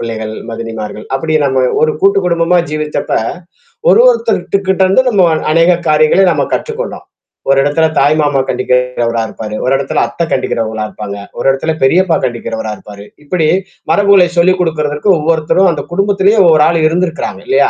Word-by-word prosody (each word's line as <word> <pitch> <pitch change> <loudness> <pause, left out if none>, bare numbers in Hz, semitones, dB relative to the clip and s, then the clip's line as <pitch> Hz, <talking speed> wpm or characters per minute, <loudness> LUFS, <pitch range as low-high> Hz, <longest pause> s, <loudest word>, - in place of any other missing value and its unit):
பிள்ளைகள், 110 -2 -5 0.2
மதினிமார்கள், 115 -2 -6
அப்பிடி 155 +4 -2
நம்ம 130 -1 0 0.2
ஒரு 155 - +2
கூட்டு 200 +1 +4
குடும்பமா 170 0 +1
ஜீவிச்சப்ப, 155 0 -3 0.8
ஒரு - - +5
ஒருத்தர்கிட்ட 200 - -1
இருந்து 195 +7 +3
நம்ம 200 -6 +3 0.3
அநேக 165 +2 +4 0.2
காரியங்களை 155 +5 +3
நம்ம - - 0
கற்றுக்கொண்டோம். 475 +2 -4 0.4
ஒரு 135 - +4
இடத்துல 145 +3 +1
தாய் 145 +2 +3
மாமா 145 -2 +1
கண்டிக்கிறவரா 125 -2 -1
இருப்பாரு. 105 -1 -7
ஒரு 130 - +1
இடத்தல 135 0 -1
அத்தை 170 - -4
கண்டிக்கிறவங்களா 110 -4 -2
இருப்பாங்க. 105 -2 -7 0.2
ஒரு - - -4
இடத்துல 145 +4 -2
பெரியப்பா 175 +5 +3
கண்டிக்கிறவரா 110 -2 -4
இருப்பாரு. 100 -1 -12 0.2
இப்பிடி, 160 +1 -1 0.4
மரபுகளை 200 -3 +4
சொல்லிக் 185 +2 +3
குடுக்கிறதற்கு 150 0 -1
ஒவ்வொருத்தரும் 160 +4 +1
அந்த 150 -3 -4
குடும்பத்திலேயே 200 +3 +1
ஒவ்வொரு 155 -3 +5
ஆள் 165 0 +1
இருந்திருக்கிறாங்க 165 - -3
இல்லயா! 140 +1 +3
155 Hz, 145 wpm, -13 LUFS, 125-180 Hz, 0.8 s, ஒரு